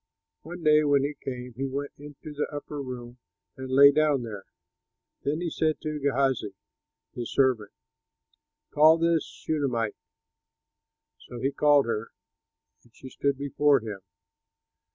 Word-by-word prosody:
One 175 +1 -9
day 150 0 +5
when 145 -2 +3
he 145 +1 -2
came, 125 -3 -7
he 135 +4 -3
went 140 +2 -4
into 145 +1 -10
the 150 - -2
upper 145 0 -6
room 125 -2 -8 0.4
and 130 0 -7
lay 140 +2 +8
down 150 -3 +2
there. 105 -4 -7 0.8
Then 150 +4 -2
he 170 -2 -2
said 155 -1 0
to 155 -1 -4
Gehazi 135 -7 0 0.6
his 120 -2 -5
servant, 125 -7 +2 1.0
"Call 155 +2 +6
this 165 -1 +2
Shunamite." 125 -8 -2 1.3
So 120 - -10
he 135 +3 0
called 145 -1 +4
her, 115 -1 -3 0.7
and 120 - -25
she 130 - -11
stood 140 +1 -1
before 140 0 +2
him. 105 -3 -6
140 Hz, 135 wpm, -27 LUFS, 125-150 Hz, 1.3 s, lay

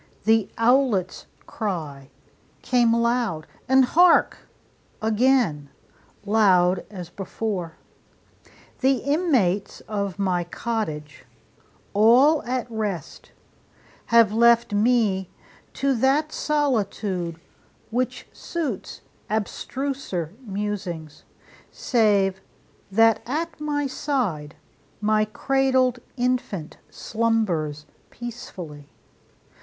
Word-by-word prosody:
The 220 -1 +3
owlet's 230 -6 +2 0.2
cry 155 -10 -5 0.5
Came 240 -2 +3
loud 235 -8 0 0.2
and 265 0 +6
hark, 350 +6 +4 0.6
again! 220 - +1 0.6
loud 190 -4 +3
as 180 -4 -8
before. 195 -3 -4 1.0
The 265 +1 +3
inmates 255 - 0
of 200 -3 -4
my 185 -3 0
cottage, 155 - -4 0.7
all 250 +9 +5
at 250 0 -2
rest, 205 -8 -5 0.8
Have 230 -3 +5
left 235 -1 +4
me 205 -4 +2 0.4
to 275 0 +1
that 280 +6 +2
solitude, 205 - -1 0.5
which 250 +2 -2
suits 300 - -5 0.3
Abstruser 220 - -3
musings: 195 -7 -5 0.4
save 200 -5 +1 0.5
that 225 +1 +4
at 315 +4 -3
my 290 -1 -1
side 240 - -2 0.4
My 215 0 +2
cradled 260 +2 +1 0.2
infant 245 -10 -2
slumbers 190 -10 -1 0.2
peacefully. 175 -11 -9
220 Hz, 80 wpm, -24 LUFS, 185-255 Hz, 1.0 s, and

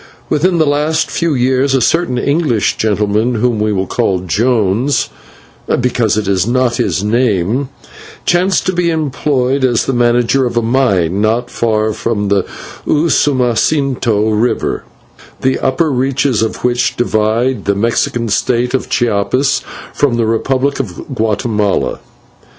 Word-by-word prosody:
Within 175 +4 +1
the 160 - +3
last 150 +2 0
few 165 -3 0
years 130 +2 +1
a - - +3
certain 165 +1 +1
English 140 - +1
gentleman, 105 +3 0
whom 115 0 0
we 105 0 0
will 95 -2 -1
call 95 0 0
Jones, 115 - +1 0.7
because 120 -4 +1
it 105 -2 -2
was 95 0 +1
not 125 -1 +1
his 95 +1 -1
name, 115 +2 0 0.6
chanced 180 +2 +2
to 185 - 0
be 175 -1 +1
employed 140 -4 0
as 120 -3 +2
the 135 - -1
manager 120 +2 +2
of 120 - -4
a 120 - +2
mine 100 -7 +1
not 115 +3 0
far 110 -2 0
from 105 -3 -2
the 100 -2 +1 0.4
Usumacinto 130 -6 +1
River, 110 +3 -1 0.6
the 130 0 +1
upper 140 +4 0
reaches 130 -2 0
of 110 - -3
which 125 0 +1
divide 115 0 0
the 100 - +1
Mexican 115 +2 0
State 120 +3 0
of 130 - -2
Chiapas 120 +3 +1 0.3
from 140 -5 +1
the 115 - +1
Republic 130 +5 0
of 115 +1 -6
Guatemala. 110 -2 -1
120 Hz, 140 wpm, -14 LUFS, 110-135 Hz, 0.7 s, the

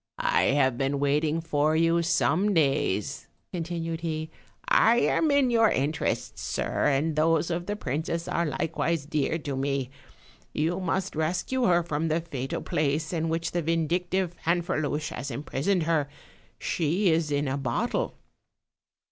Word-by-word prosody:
"I - - +2
have 130 -4 +2
been 135 +1 0
waiting 150 +3 +1
for 155 -1 +1
you 165 +1 +3
some 170 +4 +2
days," 135 - 0 0.3
con 175 - -2
tinued 165 -1 -4
he; 160 -1 -3 0.4
"I 235 - +5
am 310 +6 +2
in 280 -3 +3
your 225 -2 +5
interests, 145 +4 -1
sir, - - -1
and 145 +2 +1
those 165 +2 +2
of 175 +1 -3
the 205 - -1
princess 160 0 -3
are 170 -1 0
likewise 155 +1 -1
dear 150 +1 0
to 145 -4 -4
me: 135 -1 -1 0.6
you 165 +4 0
must 190 +1 -2
rescue 180 +11 0
her 175 -1 +4
from 160 -1 -2
the 160 +1 +1
fatal 135 -5 -4
place 155 +2 -1
in 165 -1 -1
which 165 +1 -1
the 175 - 0
vindictive 170 +3 0
Fanferluche 165 -3 0
has 140 - -5
imprisoned 150 +8 -1
her; 155 -3 +1 0.5
she 175 +4 +1
is 160 -1 +1
in 145 0 0
a 135 - -1
bottle." 130 -4 -1
160 Hz, 150 wpm, -27 LUFS, 145-170 Hz, 0.6 s, I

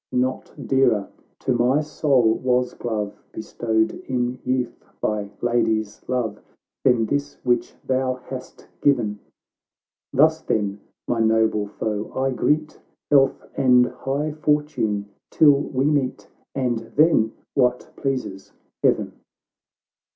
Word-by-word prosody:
Not 130 +1 -1
dearer 120 -5 +2 0.3
to 130 - +1
my 125 +4 +3
soul 135 -6 +2
was 125 +1 0
glove, 105 -3 -4
Bestowed 110 0 -1 0.2
in 125 0 -1
youth 125 -2 -2 0.2
by 105 -1 -1
lady's 110 -3 0
love. 115 -5 -1 0.4
Than 125 -4 +4
this 145 +4 -2
which 120 -1 0
thou 130 0 0
hast 130 0 -10
given! 115 -7 +2 0.9
Thus, 160 +3 +4
then, 100 -6 -1 0.3
my 120 - 0
noble 110 -2 +2
foe 105 0 -4
I 135 +1 +1
greet; 150 +4 0 0.3
Health 135 -2 +4
and 125 -1 +5
high 140 +5 -3
fortune 150 -9 0 0.2
till 150 -2 +6
we 140 -1 -1
meet, 145 -4 0 0.3
And 125 -4 0 0.2
then 145 -8 +4
— - - -49
what 125 -2 +1
pleases 130 -8 -4 0.3
Heaven." - - +2
125 Hz, 115 wpm, -23 LUFS, 110-135 Hz, 0.9 s, till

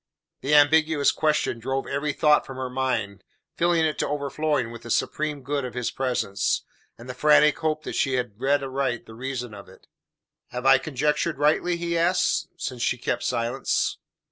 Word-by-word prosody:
The 145 +2 +1
ambiguous 150 0 +4
question 150 -6 0
drove 135 +3 -2
every 145 +2 -2
thought 150 +1 +3
from 135 - -9
her 130 -1 -4
mind, 115 -7 -2 0.3
filling 170 -1 +2
it 155 - -2
to - - 0
overflowing 145 -3 -1
with 115 - -9
the 115 - -10
supreme 150 +3 -1
good 140 +1 -2
of 125 -2 -6
his 125 -1 -2
presence, 125 -6 -1 0.3
and 120 - -12
the 125 - -5
frantic 150 +2 +4
hope 155 -1 -1
that - - -5
she 135 - 0
had 120 -3 -4
read 140 +1 +2
aright 130 -3 -2
the 110 - -12
reason 125 -1 -5
of 100 -2 -11
it. 95 - -18 0.6
"Have 125 +1 -6
I 135 -1 +7
conjectured 150 +3 -1
rightly?" 155 +4 +2
he 170 0 -2
asked, 180 +2 +1
since 130 -7 -5
she 125 - +1
kept 120 - -2
silence. 120 +2 -1
135 Hz, 180 wpm, -25 LUFS, 125-150 Hz, 0.6 s, I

